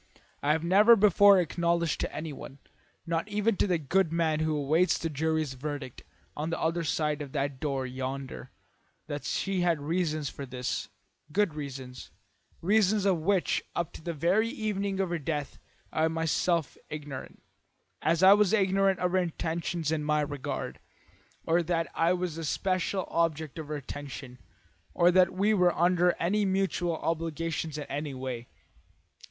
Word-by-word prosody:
I 150 Hz, +1 st, +3 dB
have 160 Hz, +1 st, -1 dB
never 205 Hz, +7 st, +7 dB
before 200 Hz, -1 st, +6 dB
acknowledged 170 Hz, -1 st, 0 dB
to -, -, -2 dB
anyone, 150 Hz, -3 st, -7 dB, 0.5 s
not 165 Hz, +2 st, -1 dB
even 210 Hz, +1 st, +1 dB
to -, -, +2 dB
the 180 Hz, -2 st, +2 dB
good 165 Hz, +3 st, +1 dB
man 165 Hz, -2 st, +1 dB
who 155 Hz, -1 st, 0 dB
awaits 155 Hz, +6 st, +2 dB
this 165 Hz, -, -3 dB
jury's 155 Hz, -1 st, 0 dB
verdict 145 Hz, -1 st, -6 dB, 0.3 s
on 155 Hz, +2 st, -3 dB
the 165 Hz, -, -2 dB
other 165 Hz, +1 st, 0 dB
side 150 Hz, -1 st, 0 dB
of 140 Hz, -2 st, -7 dB
that 140 Hz, -2 st, -2 dB
door 135 Hz, -3 st, -1 dB
yonder, 130 Hz, +1 st, -5 dB, 0.6 s
that 145 Hz, -2 st, -5 dB
she 195 Hz, -2 st, -1 dB
had 170 Hz, -3 st, +2 dB
reasons 155 Hz, -1 st, -1 dB
for 140 Hz, -, -7 dB
this, 125 Hz, 0 st, -3 dB, 0.4 s
good 200 Hz, -1 st, +2 dB
reasons, 135 Hz, -4 st, -7 dB, 0.5 s
reasons 205 Hz, +1 st, +3 dB
of 190 Hz, -4 st, +3 dB
which 185 Hz, +3 st, +1 dB
up 170 Hz, -2 st, -2 dB
to -, -, -10 dB
the 170 Hz, +1 st, -4 dB
very 180 Hz, +9 st, +2 dB
evening 200 Hz, -3 st, -2 dB
of 190 Hz, -2 st, 0 dB
her 170 Hz, -, -1 dB
death 145 Hz, -1 st, -4 dB, 0.3 s
I 160 Hz, 0 st, +2 dB
was 160 Hz, -, -3 dB
myself 165 Hz, 0 st, 0 dB
ignorant, 145 Hz, -3 st, -7 dB, 0.6 s
as 165 Hz, +3 st, +2 dB
I 190 Hz, +1 st, +10 dB
was 210 Hz, -1 st, +3 dB
ignorant 195 Hz, -2 st, +3 dB
of 180 Hz, -1 st, 0 dB
her 185 Hz, -, +3 dB
intentions 170 Hz, -2 st, -2 dB
in 155 Hz, -2 st, 0 dB
my 150 Hz, 0 st, +2 dB
regard, 145 Hz, -2 st, -4 dB, 0.7 s
or 170 Hz, +2 st, +3 dB
that 165 Hz, 0 st, 0 dB
I 165 Hz, +2 st, +2 dB
was 180 Hz, -3 st, -3 dB
the 165 Hz, -, -4 dB
special 185 Hz, +3 st, -1 dB
object 160 Hz, -2 st, -1 dB
of 155 Hz, -, -6 dB
her 150 Hz, -, -3 dB
attention, 140 Hz, -2 st, -7 dB, 0.6 s
or 175 Hz, +1 st, +5 dB
that 185 Hz, 0 st, +5 dB
we 200 Hz, +4 st, +2 dB
were 180 Hz, -3 st, +3 dB
under 175 Hz, +1 st, +3 dB
any 205 Hz, +5 st, +1 dB
mutual 190 Hz, -3 st, 0 dB
obligations 165 Hz, -1 st, -2 dB
in 150 Hz, -, -4 dB
any 145 Hz, -1 st, -4 dB
way. 130 Hz, -2 st, -5 dB
165 Hz, 165 wpm, -29 LUFS, 150-185 Hz, 0.7 s, I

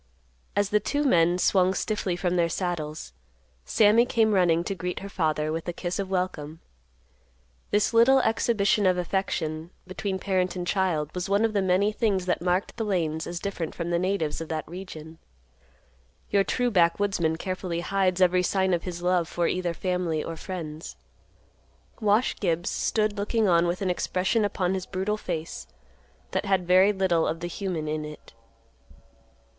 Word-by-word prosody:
As 205 Hz, -1 st, +1 dB
the 210 Hz, -, +3 dB
two 290 Hz, +8 st, -1 dB
men 175 Hz, -, +3 dB
swung 185 Hz, 0 st, +3 dB
stiffly 205 Hz, -4 st, -1 dB
from 180 Hz, 0 st, -1 dB
their 170 Hz, -1 st, +2 dB
saddles, 160 Hz, -4 st, -4 dB, 0.5 s
Sammy 215 Hz, -, +5 dB
came 225 Hz, -3 st, +2 dB
running 170 Hz, -3 st, +3 dB
to 195 Hz, -, -3 dB
greet 180 Hz, -1 st, -4 dB
her 200 Hz, -, -7 dB
father 155 Hz, -4 st, 0 dB
with 165 Hz, +1 st, -4 dB
a 175 Hz, -, -2 dB
kiss 175 Hz, +2 st, -4 dB
of 195 Hz, -1 st, -3 dB
welcome; 165 Hz, -5 st, -3 dB, 1.1 s
this 210 Hz, +2 st, +1 dB
little 235 Hz, +4 st, +6 dB
exhibition 215 Hz, -3 st, +2 dB
of 185 Hz, -1 st, +3 dB
affection 170 Hz, -3 st, -2 dB, 0.2 s
between 190 Hz, +1 st, -3 dB
parent 185 Hz, -1 st, 0 dB
and 180 Hz, -1 st, -3 dB
child 175 Hz, -6 st, 0 dB
was 180 Hz, +1 st, -4 dB
one 200 Hz, +3 st, +3 dB
of 225 Hz, -, -1 dB
the 200 Hz, -, +2 dB
many 190 Hz, +3 st, +2 dB
things 205 Hz, -4 st, 0 dB
that 180 Hz, -, 0 dB
marked 180 Hz, +5 st, -1 dB
the 225 Hz, -, -1 dB
Lanes 165 Hz, -6 st, -1 dB
as 175 Hz, 0 st, -4 dB
different 185 Hz, -5 st, -4 dB
from 170 Hz, 0 st, -3 dB
the 170 Hz, -, +2 dB
natives 185 Hz, -4 st, -1 dB
of 165 Hz, -, -6 dB
that 155 Hz, -2 st, -3 dB
region. 160 Hz, -2 st, -9 dB, 1.1 s
Your 200 Hz, -1 st, +4 dB
true 245 Hz, +4 st, 0 dB
backwoodsman 170 Hz, -2 st, +2 dB
carefully 180 Hz, -1 st, -3 dB
hides 190 Hz, 0 st, 0 dB
every 180 Hz, 0 st, +4 dB
sign 190 Hz, 0 st, +1 dB
of 170 Hz, -, +1 dB
his 175 Hz, -1 st, -6 dB
love 180 Hz, -2 st, +2 dB
for 175 Hz, 0 st, -1 dB
either 180 Hz, -2 st, -1 dB
family 180 Hz, -4 st, -1 dB
or 165 Hz, -, -5 dB
friends. 160 Hz, -3 st, -7 dB, 1.0 s
Wash 215 Hz, +2 st, +2 dB
Gibbs 170 Hz, -3 st, -1 dB
stood 215 Hz, -1 st, 0 dB
looking 210 Hz, +2 st, +1 dB
on 170 Hz, -1 st, +4 dB
with 175 Hz, +3 st, -2 dB
an 185 Hz, -, +1 dB
expression 185 Hz, +5 st, 0 dB
upon 185 Hz, -2 st, -1 dB
his 185 Hz, -1 st, -3 dB
brutal 195 Hz, +3 st, -2 dB
face 165 Hz, -5 st, -5 dB, 0.6 s
that 190 Hz, +2 st, -1 dB
had 190 Hz, -2 st, +1 dB
very 185 Hz, +3 st, +5 dB
little 190 Hz, -4 st, +1 dB
of 165 Hz, -, -2 dB
the 175 Hz, -, -4 dB
human 175 Hz, -4 st, -4 dB
in 155 Hz, 0 st, -2 dB
it. 150 Hz, 0 st, -10 dB
185 Hz, 170 wpm, -26 LUFS, 170-200 Hz, 1.1 s, little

